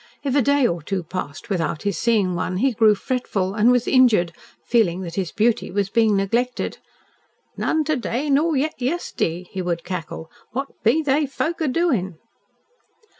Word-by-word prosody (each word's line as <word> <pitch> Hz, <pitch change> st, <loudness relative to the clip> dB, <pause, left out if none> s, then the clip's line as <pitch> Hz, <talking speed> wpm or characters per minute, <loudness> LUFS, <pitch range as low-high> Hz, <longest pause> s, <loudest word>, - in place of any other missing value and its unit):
If 275 Hz, -2 st, -1 dB
a 285 Hz, -, +5 dB
day 280 Hz, +1 st, +3 dB
or 170 Hz, -6 st, 0 dB
two 185 Hz, +4 st, -3 dB
passed 180 Hz, +5 st, -6 dB
without 165 Hz, -4 st, -1 dB
his 200 Hz, -3 st, -1 dB
seeing 205 Hz, -2 st, +1 dB
one, 180 Hz, +1 st, -2 dB
he 265 Hz, +7 st, +2 dB
grew 220 Hz, -2 st, +4 dB
fretful, 200 Hz, -5 st, -2 dB
and 215 Hz, +3 st, +3 dB
was 245 Hz, -1 st, +2 dB
injured, 220 Hz, -10 st, +4 dB, 0.3 s
feeling 190 Hz, -7 st, +2 dB
that 170 Hz, -3 st, -6 dB
his 185 Hz, -2 st, -2 dB
beauty 225 Hz, +1 st, +1 dB
was 195 Hz, 0 st, -1 dB
being 220 Hz, -3 st, +3 dB
neglected! 235 Hz, +6 st, -1 dB, 0.8 s
"None 315 Hz, -1 st, 0 dB
to 310 Hz, +1 st, 0 dB
day, 250 Hz, +4 st, -2 dB
nor 305 Hz, +3 st, +3 dB
yet 295 Hz, 0 st, -2 dB
yest'day," 245 Hz, -, -2 dB
he 190 Hz, -, -3 dB
would 170 Hz, -2 st, -2 dB
cackle. 165 Hz, -3 st, -6 dB, 0.2 s
"What 270 Hz, +3 st, -3 dB
be 275 Hz, +9 st, +3 dB
they 290 Hz, +1 st, +2 dB
folk 320 Hz, +5 st, -3 dB
a 315 Hz, -, +1 dB
doin'?" 250 Hz, -, 0 dB
225 Hz, 175 wpm, -22 LUFS, 185-265 Hz, 0.8 s, a